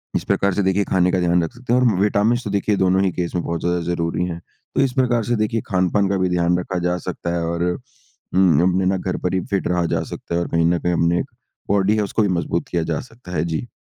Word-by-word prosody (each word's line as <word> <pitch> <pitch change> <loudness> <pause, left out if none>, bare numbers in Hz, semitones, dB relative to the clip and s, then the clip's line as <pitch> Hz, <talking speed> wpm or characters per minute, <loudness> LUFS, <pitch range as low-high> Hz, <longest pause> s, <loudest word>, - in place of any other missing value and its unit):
इस - - 0
प्रकार 100 -1 +1
से 100 - 0
देखिए 95 +2 +2
खाने 90 -1 +3
का 95 - +1
ध्यान 85 0 +2
रख 80 - -3
सकते 120 0 -3
हैं 125 - +5
और 125 - +3 0.2
विटामिन्स 105 +4 +2
तो 105 - -4
देखिए 100 +1 +1
दोनों 95 0 +3
ही 95 - +1
केस 90 0 -3
में 85 - 0
बहुत 85 -1 -3
ज़्यादा 85 0 0
ज़रूरी 85 +1 -1
हैं। 85 -2 -4 0.4
तो - - +3
इस 135 -2 +2
प्रकार 120 -3 +2
से 120 +2 0
देखिए, 110 0 0
खान-पान 95 +1 +1
का 100 - +1
भी 95 -1 +1
ध्यान 90 0 +2
रखा 90 0 -3
जा 90 0 0
सकता 85 0 -3
है 85 - -1
और 85 +1 -1 0.7
उम, 90 -4 +4
अपने 95 +1 +1
ना 95 0 +2
घर 90 0 -3
पर 90 - 0
ही 95 - +2
फिट 100 - 0
रहा 90 -1 +1
जा - - 0
सकता 85 - -5
है 85 - +1
और - - -2
कहीं 85 0 +1
ना 85 +1 +3
कहीं 90 +1 0
अपने 85 +1 +2
एक - - -2 0.4
बॉडी 100 +1 +3
है, 105 - +1
उसको 105 +2 -1
भी 105 - +3
मज़बूत 85 0 -2
किया 85 -2 0
जा 75 - -1
सकता 115 -6 -13
है। 80 -3 0
जी। 80 +8 -3
90 Hz, 275 wpm, -21 LUFS, 85-100 Hz, 0.7 s, हैं